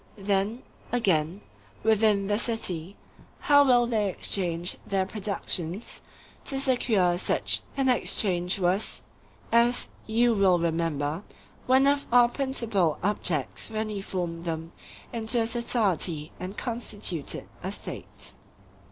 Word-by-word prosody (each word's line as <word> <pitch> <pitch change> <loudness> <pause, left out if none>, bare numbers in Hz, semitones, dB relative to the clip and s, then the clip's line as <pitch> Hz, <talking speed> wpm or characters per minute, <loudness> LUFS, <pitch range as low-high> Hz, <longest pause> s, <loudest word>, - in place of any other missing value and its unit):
Then, 200 +4 0 0.3
again, 185 -6 +1 0.4
within 215 -2 +3
the 205 +1 +1
city, 200 -6 -1 0.5
how 285 -1 +6
will 245 -3 +5
they 220 -4 0
exchange 175 -2 -1
their 195 -1 0
productions? 195 -2 -2 0.4
To 270 - -1
secure 220 -10 +2
such - - 0 0.2
an 270 -1 +2
exchange 185 -7 +1
was, 185 +3 0 0.5
as 235 +1 +3 0.2
you 230 +2 +3
will 195 -4 +4
remember, 165 -2 -1 0.5
one 260 +2 +5
of 280 0 +2
our 240 0 +6
principal 230 - 0
objects 180 - -1
when 220 0 -2
we 205 -2 -4
formed 175 -3 -4
them 165 0 -4 0.4
into 230 +1 +1
a 225 - +2
society 195 - 0
and 185 +3 -6
constituted 210 - -3
a - - -3
State. - - -5
205 Hz, 115 wpm, -27 LUFS, 175-235 Hz, 0.5 s, how